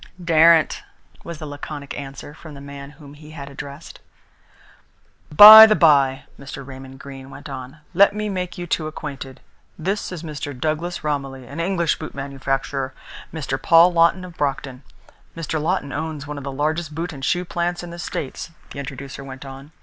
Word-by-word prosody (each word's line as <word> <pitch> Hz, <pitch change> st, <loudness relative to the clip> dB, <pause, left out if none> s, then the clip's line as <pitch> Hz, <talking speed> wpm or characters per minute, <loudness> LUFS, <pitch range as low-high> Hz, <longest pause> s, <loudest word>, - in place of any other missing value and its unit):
"Daren't!" 165 Hz, -1 st, +4 dB, 0.4 s
was 170 Hz, -1 st, -7 dB
the 155 Hz, -, -8 dB
laconic 145 Hz, 0 st, -7 dB
answer 140 Hz, +1 st, -8 dB
from 155 Hz, -1 st, -12 dB
the -, -, -10 dB
man 140 Hz, 0 st, -9 dB
whom 145 Hz, -2 st, -13 dB
he 150 Hz, +1 st, -14 dB
had 140 Hz, 0 st, -8 dB
addressed. 140 Hz, +2 st, -10 dB, 1.3 s
"By 215 Hz, +7 st, +12 dB
the 215 Hz, -, +3 dB
bye," 140 Hz, -6 st, +4 dB, 0.2 s
Mr. 135 Hz, -1 st, -9 dB
Raymond 135 Hz, 0 st, -11 dB
Greene 135 Hz, -1 st, -10 dB
went 145 Hz, +1 st, -11 dB
on, 135 Hz, +2 st, -9 dB
"let 200 Hz, +3 st, +5 dB
me 210 Hz, 0 st, -2 dB
make 180 Hz, -3 st, -4 dB
you 175 Hz, -, -5 dB
two 160 Hz, -2 st, -2 dB
acquainted. 140 Hz, -4 st, -8 dB, 0.4 s
This 195 Hz, +5 st, -3 dB
is 175 Hz, -3 st, -7 dB
Mr. 145 Hz, -4 st, -6 dB
Douglas 160 Hz, +4 st, -2 dB
Romilly, 135 Hz, -3 st, -3 dB
an 140 Hz, +6 st, -9 dB
English 170 Hz, -2 st, 0 dB
boot 155 Hz, -, -8 dB
manufacturer 135 Hz, -1 st, -3 dB, 0.4 s
Mr. 140 Hz, -4 st, -4 dB
Paul 170 Hz, +2 st, +6 dB
Lawton 170 Hz, +2 st, +3 dB
of 175 Hz, -2 st, -12 dB
Brockton. 135 Hz, -2 st, -3 dB, 0.6 s
Mr. 160 Hz, -1 st, -3 dB
Lawton 165 Hz, -3 st, -1 dB
owns 155 Hz, -1 st, -4 dB
one 145 Hz, 0 st, -6 dB
of -, -, -10 dB
the 140 Hz, -, -5 dB
largest 155 Hz, +3 st, -2 dB
boot 165 Hz, +1 st, -4 dB
and 135 Hz, -2 st, -10 dB
shoe 180 Hz, +6 st, 0 dB
plants 175 Hz, 0 st, -2 dB
in 175 Hz, -, -8 dB
the 170 Hz, -, -9 dB
States," 150 Hz, -2 st, -5 dB, 0.2 s
the -, -, -7 dB
introducer 140 Hz, 0 st, -8 dB
went 135 Hz, 0 st, -10 dB
on. 135 Hz, +2 st, -11 dB
150 Hz, 175 wpm, -21 LUFS, 140-170 Hz, 1.3 s, By